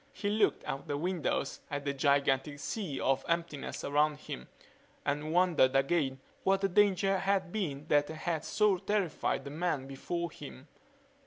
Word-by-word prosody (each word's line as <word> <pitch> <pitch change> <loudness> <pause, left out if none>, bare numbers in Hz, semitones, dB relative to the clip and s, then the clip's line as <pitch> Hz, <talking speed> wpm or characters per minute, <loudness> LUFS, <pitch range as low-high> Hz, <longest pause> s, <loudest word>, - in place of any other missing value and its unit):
He 205 - -2
looked 215 0 +2
out 135 - -5
the 145 - -1
windows 170 -4 -1
at 145 -1 -4
the 140 - 0
gigantic 140 0 +2
sea 160 -2 -4
of 135 0 +1
emptiness 170 -4 -2
around 150 +1 +2
him 65 - -7 0.6
and 150 +2 -1
wondered 170 -7 +4
again 135 -1 +2 0.2
what 195 0 +3
the 195 - +2
danger 195 0 +3
had 190 -2 0
been 150 -9 -3
that 145 0 +4
had 160 0 -2
so 210 -3 +3
terrified 195 -4 0
the 140 - -6
men 155 -3 -1
before 170 +6 -4
him. 140 -1 -10
155 Hz, 155 wpm, -32 LUFS, 140-185 Hz, 0.6 s, wondered